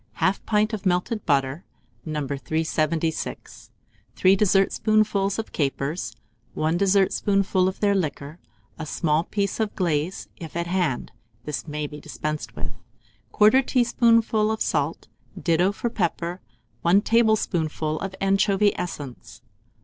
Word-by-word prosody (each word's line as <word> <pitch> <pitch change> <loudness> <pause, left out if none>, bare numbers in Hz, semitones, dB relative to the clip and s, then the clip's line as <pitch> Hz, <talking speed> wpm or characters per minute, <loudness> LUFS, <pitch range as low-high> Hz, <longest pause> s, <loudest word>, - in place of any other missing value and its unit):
1/2 190 +1 +2
pint 215 +1 +2
of 210 -3 -3
melted 190 +3 0
butter 140 +1 +1 0.4
No. 150 -3 -3
376, 155 +3 -2 0.5
3 185 +1 +5
dessertspoonfuls 200 0 +2
of 225 - -4
capers, 145 +3 -2 0.4
1 155 +2 +1
dessertspoonful 195 0 +2
of 190 - -3
their 205 -1 +3
liquor, 155 -3 -3 0.4
a 160 - -4
small 155 0 +1
piece 200 +1 -2
of 215 -2 -1
glaze, 170 -1 -1
if 165 -2 -9
at 170 0 -1
hand 175 -8 -1 0.3
(this 150 +2 -4
may 150 0 -3
be 150 0 -8
dispensed 150 0 -5
with), - - -5 0.6
1/4 215 +6 +5
teaspoonful 230 -3 +3
of 220 - -2
salt, - - -1 0.3
ditto 170 +1 +2
of 230 +3 -3
pepper, 175 -2 -2 0.4
1 180 +7 +4
tablespoonful 175 -9 +1
of 190 -1 -5
anchovy 195 +1 +3
essence. 125 -9 -7
180 Hz, 125 wpm, -24 LUFS, 155-205 Hz, 0.6 s, 3